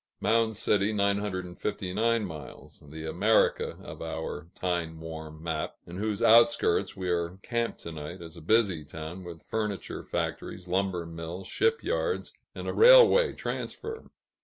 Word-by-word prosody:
Mound 110 -1 +2
City 100 0 +2
(959 100 +2 0
miles), 80 -6 -10
the 80 +2 -8
"America" 100 +7 +2
of - - -9
our 80 -1 -5
time 85 -3 -2
worn 80 -1 -8
map, 80 -2 -2
in 85 +1 -8
whose 105 0 -1
outskirts 115 -4 +5
we 95 -1 -3
are 85 +1 -1
camped 115 -1 -2
to 85 - -6
night, 80 +3 -7
is 85 -1 -10
a - - -11
busy 95 -3 +2
town 80 +4 -7
with 85 -2 -9
furniture 105 -3 -3
factories, 90 -1 -4
lumber 90 -1 0
mills, 85 +3 -7
ship 455 +2 +1
yards, 460 - -1 0.2
and - - -6
a - - -1
railway - - +8
transfer. 450 0 -5
90 Hz, 140 wpm, -28 LUFS, 80-110 Hz, 0.2 s, railway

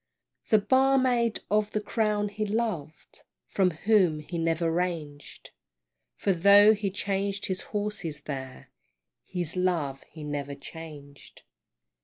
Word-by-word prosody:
The 215 - +6
barmaid 255 -1 +2
of 210 0 +1
the 215 - +1
Crown 210 -1 0
he 210 +1 -3
loved, 205 -8 -3 0.2
From 190 -2 +2
whom 180 -1 +2
he 165 +3 -6
never 165 0 0
ranged, 160 -4 -4 0.6
For 195 - +1
though 200 +4 +7
he 205 -2 -2
changed 200 0 -2
his 185 -2 -3
horses 205 -8 -3
there, 130 -3 -7 0.5
His 175 -3 -3
love 165 -7 0
he 155 - -10
never 145 -1 -4
changed. 145 -1 -11
185 Hz, 120 wpm, -27 LUFS, 155-210 Hz, 0.6 s, though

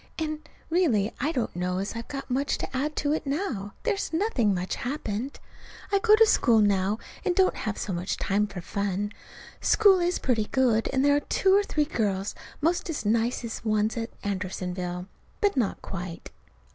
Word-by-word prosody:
And, 310 -1 -4 0.2
really, 245 - +2
I 290 +5 +1
don't 250 - -2
know 180 +1 -1
as 195 +4 -3
I've 230 0 -5
got 275 -1 -5
much 275 +3 +1
to - - -5
add 295 +4 -1
to 290 0 +1
it 310 - -2
now. 270 - -2
There's 415 -4 -1
nothing 325 - +2
much 185 -1 -2
happened. 250 -1 -3 0.5
I 400 - +4
go 425 +1 +6
to 450 +1 +7
school 240 - +4
now, 200 0 +2 0.3
and 355 - +1
don't 375 0 +4
have 215 -2 -3
so 195 - -3
much 175 +2 -2
time 205 +2 +1
for 195 -3 -7
fun. 200 +2 -2 0.5
School 400 -4 +5
is 350 0 +1
pretty 225 -5 +1
good, 235 -3 +2
and 265 +1 +2
there 285 0 +5
are - - +4
two 380 +6 +2
or 405 - +6
three 305 -7 0
girls 200 -8 -1 0.3
'most 345 +4 +1
as 300 -9 -3
nice 230 +3 +1
as 225 - -4
the 225 - -4
ones 215 +1 +2
at 230 -1 -3
Andersonville. 180 -2 -3 0.3
But 410 -5 +2
not 235 -7 0
quite. 180 -2 -6
235 Hz, 190 wpm, -27 LUFS, 200-310 Hz, 0.5 s, to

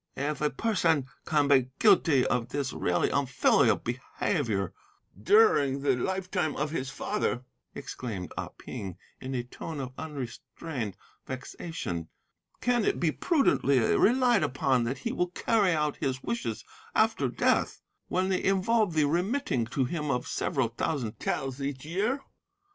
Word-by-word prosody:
"'If 145 +2 -2
a 150 - +3
person 165 - +1 0.2
can 150 -2 +3
be 135 -3 +4
guilty 160 - +5
of 120 -2 0
this 140 -1 -2
really 90 -1 +1
unfilial 130 -5 +3
behaviour 120 - -2 0.5
during 145 - +4
the 135 -2 +3
lifetime 180 +2 -1
of 150 +1 -2
his 135 -5 -2
father,' 135 - -2 0.3
exclaimed 105 -8 -6
Ah - - -4
Ping, 95 -4 -7 0.2
in 130 +1 -5
a 120 - -1
tone 145 +5 -7
of 130 -2 -4
unrestrained 135 - -5 0.3
vexation, 130 - -5 0.5
'can 245 -2 +2
it - - +1
be 165 -3 +2
prudently 275 - +2 0.2
relied 245 -2 +4
upon 130 -4 +1
that 125 +4 -2
he 235 - -3
will 180 - 0
carry 205 +1 +2
out 150 -3 0
his 130 -1 -2
wishes 115 -2 -3 0.3
after - - +3
death, - - +1 0.3
when 185 +1 0
they 185 - 0
involve 195 0 +2
the 155 -2 +4
remitting 170 - 0
to 130 +2 0
him 150 +2 -3
of 125 -2 0
several 130 -4 0
thousand 120 -1 -3
taels 135 0 -2
each 140 -1 -4
year? 210 - 0
145 Hz, 140 wpm, -29 LUFS, 125-180 Hz, 0.5 s, guilty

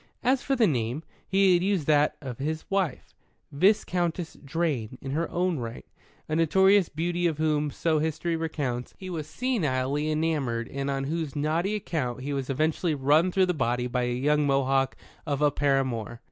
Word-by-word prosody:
As 255 +1 +3
for 275 - 0
the 240 -3 +4
name, 125 - -1 0.2
he 195 -1 +4
had 175 - +3
used 190 -6 +1
that 150 0 +3
of 130 -4 -7
his 155 +3 -3
wife, 190 -8 -1 0.4
Viscountess 175 0 +1
Drane 140 -6 -2
in 135 - -6
her 165 +4 -1
own 175 -3 0
right, 115 - -6 0.4
a 155 - -1
notorious 190 +3 +4
beauty 175 +3 0
of 160 -3 -2
whom, 150 -1 +1
so 160 +2 0
History 160 +2 -1
recounts, 145 -7 -3
he 185 -1 -7
was 155 -3 -4
senilely 150 - -1
enamoured 145 -7 -1
and 140 0 -3
on 135 -1 -1
whose 155 0 -3
naughty 160 +7 0
account 145 - -3
he 145 +2 -3
was 135 -1 -3
eventually 155 +3 0
run 150 +6 +3
through 190 +1 +3
the 180 - 0
body 125 -4 0
by 125 0 -1
a 120 - -1
young 145 +3 +2
Mohawk 135 -1 +2 0.3
of 140 -2 -1
a 150 -1 +4
paramour. 130 -6 0
150 Hz, 175 wpm, -27 LUFS, 135-170 Hz, 0.4 s, the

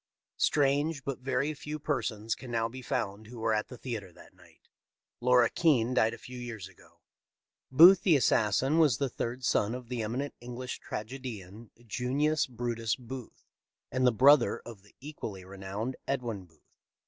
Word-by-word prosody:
Strange, 145 +1 +2
but 135 -2 -4
very 130 +3 -1
few 150 +1 -6
persons 115 -7 -2
can 130 - -9
now 115 -1 0
be 130 +3 -9
found 105 -3 -3
who 120 +2 -10
were 110 0 0
at 105 0 0
the 125 - -10
theatre 110 -8 -5
that - - -17
night. - - -22 0.5
Laura 125 -1 +5
Keene 130 -6 +2
died 115 -2 +2
a - - -13
few 125 +2 -9
years 115 -6 -6
ago. 95 - -21 0.3
" - - -63 0.3
Booth 170 +7 +9
the 180 -5 +4
assassin 130 +4 +3
was 145 -9 +4
the 140 - -1
third 125 +2 -4
son 110 0 +2
of 125 -2 -9
the 125 -2 -3
emi 110 +3 -3
nent 145 - -6
English 125 +1 -6
tragedian 110 -3 -7 0.2
Junius 140 +6 0
Brutus 115 -3 -2
Booth, 125 -1 -10 0.5
and 130 0 +2
the - - +6
brother 135 +3 +5
of 115 -4 -10
the 100 0 -23
equally 115 -10 -7
renowned 100 +6 -5
Edwin 120 -8 -2
Booth. 80 -3 -30
125 Hz, 170 wpm, -30 LUFS, 110-135 Hz, 0.5 s, Booth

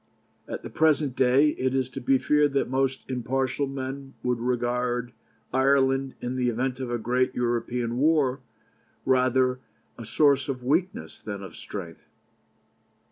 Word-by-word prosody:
At - - -6
the - - -7
present 150 -4 +2
day, 130 +4 +4
it 130 0 0
is 130 -2 +1
to 135 +1 -7
be 135 +2 +3
feared 150 +1 +2
that 140 - +1
most 135 0 -1
impartial 130 +2 -1
men 135 0 -6
would 125 -1 0
regard 125 0 -1 0.4
Ireland, 135 0 +2
in 125 +1 -3
the 125 -1 +1
event 125 +2 -2
of 130 -2 -4
a 120 - -1
great 125 +3 0
European 120 0 -1
war, 145 -3 +3 0.7
rather 130 0 +3
as 125 - -9 0.4
a 115 - -7
source 140 -2 +3
of 130 -2 -3
weakness 185 - -1
than 100 -2 -6
of 95 - -10
strength. 85 -5 -8
130 Hz, 150 wpm, -26 LUFS, 125-135 Hz, 0.7 s, day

